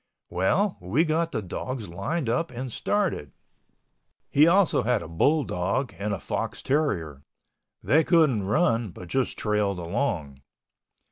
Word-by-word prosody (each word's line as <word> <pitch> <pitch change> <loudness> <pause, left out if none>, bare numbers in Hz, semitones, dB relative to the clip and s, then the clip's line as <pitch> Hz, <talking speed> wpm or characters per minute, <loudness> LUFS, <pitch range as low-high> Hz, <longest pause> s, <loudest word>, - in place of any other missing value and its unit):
Well, 135 - +1
we 110 - +1
got 165 +1 0
the 110 - -3
dogs 120 +5 -5
lined 115 - -3
up 125 +8 0
and 125 0 -6
started. 185 - -1 1.0
He 150 +3 +6
also 190 +2 +4
had 120 0 0
a - - -8
bull 140 - +2
dog 100 +5 -2
and 105 +1 -2
a 100 - -2
fox - - -4
terrier. 90 - -1 0.6
They 160 +3 +4
couldn't 145 - +3
run 115 - +2
but 90 0 -11
just 130 +4 -1
trailed 105 -3 0
along. 85 - -2
120 Hz, 140 wpm, -26 LUFS, 95-155 Hz, 1.0 s, He